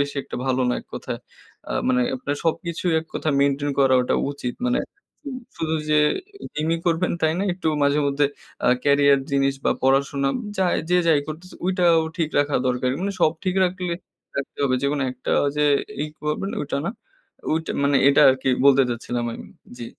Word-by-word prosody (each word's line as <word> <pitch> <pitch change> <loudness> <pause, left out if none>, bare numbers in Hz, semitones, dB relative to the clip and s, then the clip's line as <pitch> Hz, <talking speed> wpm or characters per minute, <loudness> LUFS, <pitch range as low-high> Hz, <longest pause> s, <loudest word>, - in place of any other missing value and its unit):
বেশি 140 0 -1
একটা - - -7
ভালো 130 0 +1
না, 125 - +1
এক - - -22
কথায়। - - -5 0.5
আ - - -1 0.2
মানে 125 -1 +3 0.2
আপনার 145 +3 -3
সবকিছুই 170 +1 -1
এক 160 - -13
কথা - - -2
মেইনটেইন 140 +1 +1
করাটা 130 -2 +3 0.2
উচিত। 125 -4 -5
মানে 250 - +1 0.8
শুধু 160 0 -1 0.2
যে 150 - +5 0.6
জিমই 160 +2 0
করবেন 170 +2 +1
তাই 160 0 +3
না, 195 - 0
একটু 175 -3 -2
মাঝে-মধ্যে 140 0 +2 0.4
আ - - +5 0.2
ক্যারিয়ার 140 -1 +5
জিনিস 135 0 +2
বা - - +3
পড়াশোনা, 135 +1 +2 0.3
যা 190 - +2 0.3
যে 180 - +5
যাই 155 -3 +5
করতেছে, 165 +4 -8
ওটাও 175 -3 +4 0.2
ঠিক 160 -3 -1
রাখা 145 0 +2
দরকার। 125 0 0
মানে 200 +1 -1
সব 155 - +4
ঠিক 185 -1 0
রাখলে 180 -1 -2 0.4
রাখতে 140 - -5
হবে। 130 -2 +2
যেকোনো 140 0 0
একটা 130 - -6
ওই 140 - +1
যে, 150 - +2 0.4
ই - - -4 0.2
করবেন 150 +6 -2
ওইটা 140 - -2
না। - - 0 0.6
ওইটা 160 +1 -1
মানে, 140 0 +3
এটা 140 - +5
আরকি 130 0 -1 0.2
বলতে 140 -1 +6
চাচ্ছিলাম 120 0 -3
আমি। - - -9 0.3
জি। 120 - -5
145 Hz, 175 wpm, -23 LUFS, 135-165 Hz, 0.8 s, বলতে